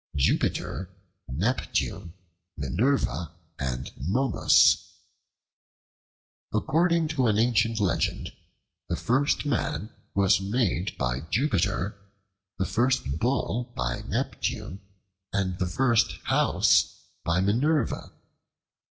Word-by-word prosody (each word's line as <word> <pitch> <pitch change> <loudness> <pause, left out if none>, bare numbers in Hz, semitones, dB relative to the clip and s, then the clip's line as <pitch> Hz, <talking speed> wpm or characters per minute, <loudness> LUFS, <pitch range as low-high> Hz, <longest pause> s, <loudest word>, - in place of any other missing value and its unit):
Jupiter, 85 +6 0 0.4
Neptune, 85 - -2 0.4
Minerva, 80 - 0 0.3
and 65 -1 -3
Momus 105 - +3 1.6
ACCORDING 170 +1 +2
to 135 -6 +1
an 105 -2 +2
ancient 115 -1 +2
legend, 100 -4 0 0.6
the - - 0
first 135 +5 +1
man 120 -5 -1 0.2
was 95 -1 +4
made 95 -3 -1
by 65 0 -1
Jupiter, 100 - 0 0.6
the 95 - 0
first 120 - 0
bull 125 -1 -1
by - - -2
Neptune, 95 +3 -3 0.5
and 95 -2 -1
the 90 - 0
first 120 +4 +2
house - - +2 0.2
by 85 +2 +1
Minerva. 120 +9 +1
100 Hz, 90 wpm, -27 LUFS, 85-125 Hz, 1.6 s, was